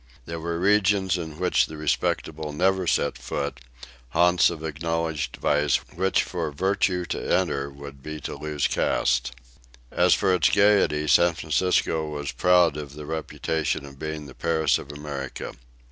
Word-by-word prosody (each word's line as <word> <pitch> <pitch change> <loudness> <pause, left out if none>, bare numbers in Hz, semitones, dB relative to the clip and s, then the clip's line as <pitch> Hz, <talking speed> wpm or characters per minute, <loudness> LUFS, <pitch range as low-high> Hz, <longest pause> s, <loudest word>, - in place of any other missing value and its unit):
There 85 +4 -5
were 85 +1 -3
regions 100 -1 +3
in 80 -4 -5
which 90 +1 +2
the 80 - -9
respectable 75 +1 -1
never 95 +3 +1
set - - +1
foot, - - -4 0.5
haunts 85 +4 +4
of 80 -2 -7
acknowledged 80 -3 -2
vice 75 -1 +2 0.2
which 95 0 +1
for 85 -4 -3
virtue 90 +2 0
to - - -3
enter 70 0 +1
would 70 -1 -11
be 75 +2 -6
to - - -5
lose 75 0 -2
caste. - - +1 0.6
As - - +4
for 95 - +2
its 85 -5 +3
gayety, 100 -7 +3
San 85 +3 +4
Francisco 80 -1 0
was 75 -2 -4
proud 90 -4 +3
of 75 -2 -7
the 75 0 -8
reputation 80 -1 -2
of 70 -1 -13
being 80 -1 -5
the 65 - -11
Paris 80 0 +1
of 70 - -9
America. 70 -3 -6
80 Hz, 155 wpm, -25 LUFS, 75-90 Hz, 0.6 s, haunts